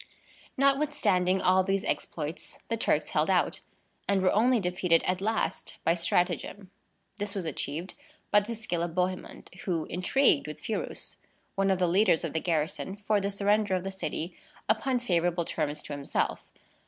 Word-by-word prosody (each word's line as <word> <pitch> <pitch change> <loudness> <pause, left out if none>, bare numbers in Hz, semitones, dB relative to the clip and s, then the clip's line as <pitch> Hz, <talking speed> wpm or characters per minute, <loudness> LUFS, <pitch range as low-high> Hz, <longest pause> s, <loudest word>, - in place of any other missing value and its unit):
Notwithstanding 265 -10 +2
all 185 +1 +5
these 195 +1 0
exploits, 155 +1 -4
the 230 - +1
Turks 225 - +1
held - - +1
out, - - +2 0.5
and 195 -2 +3
were 185 - +4
only 240 +3 +4
defeated 180 -2 +2
at 185 +1 -1
last 220 +2 -2
by 165 - +4
stratagem. 180 +3 0 0.5
This 205 -1 -4
was 190 -4 -3
achieved 160 +3 -3 0.4
by 205 - +7
the 220 +3 -5
skill 195 -6 -2
of 170 -1 -3
Bohemond, 185 0 -2
who 170 -4 0
intrigued 185 - +3
with - - -7
Phirous, - - -4 0.4
one 195 0 +1
of 190 - +3
the 180 - +2
leaders 185 -1 +3
of 165 - -3
the 160 - +1
garrison, 165 +3 -1
for 205 0 0
the 200 - -1
surrender 205 0 +2
of 180 - -2
the 195 - -3
city, 180 -2 -4 0.3
upon 250 +4 +2
favorable 175 -6 +1
terms 150 -2 -2
to - - -6
himself. 140 -1 -2
185 Hz, 165 wpm, -29 LUFS, 175-205 Hz, 0.5 s, by